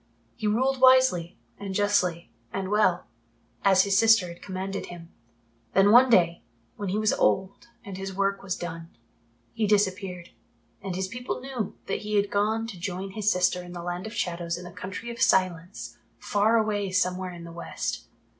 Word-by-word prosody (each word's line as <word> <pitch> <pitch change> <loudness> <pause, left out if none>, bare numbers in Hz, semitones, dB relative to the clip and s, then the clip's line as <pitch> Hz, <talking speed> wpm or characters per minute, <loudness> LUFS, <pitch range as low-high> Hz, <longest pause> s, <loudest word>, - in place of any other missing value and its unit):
He 215 - -3
ruled 260 +5 +1
wisely 255 -10 +5 0.2
and 195 -1 -5
justly 180 -4 +1 0.2
and 190 -1 -3
well, 185 -4 +2 0.6
as 190 -1 +5
his 200 -1 +2
sister 225 -5 +5
had 170 - -11
commanded 195 +1 -5
him. 170 -1 -11 0.6
Then 195 +2 +6
one 250 +3 +7
day, 170 -6 +3 0.3
when 200 -2 -4
he 195 - -1
was 215 0 +2
old 190 +4 0 0.2
and 195 -3 -7
his 195 0 -4
work 195 +1 -1
was 190 -2 -3
done, 165 -1 -7 0.6
he 220 -2 0
disappeared, 190 -3 0 0.5
and 190 -2 -4
his 190 +1 -2
people 245 +5 -5
knew 255 -6 -5
that - - -2
he 210 0 -3
had 205 0 +1
gone 215 +2 +1
to 200 -6 -8
join 190 +2 -4
his 210 +1 +1
sister 180 0 +1
in 175 0 -10
the 175 -1 -7
Land 175 +3 -4
of 220 - -9
Shadows 170 -1 -2
in 175 - -9
the 175 - -9
Country 205 +4 -7
of 235 0 -8
Silence 165 - 0 0.2
far 210 - +2
away 205 -3 0
somewhere 185 -1 0
in 170 -1 -10
the 170 - -9
West. 170 +1 -5
195 Hz, 180 wpm, -26 LUFS, 180-210 Hz, 0.6 s, one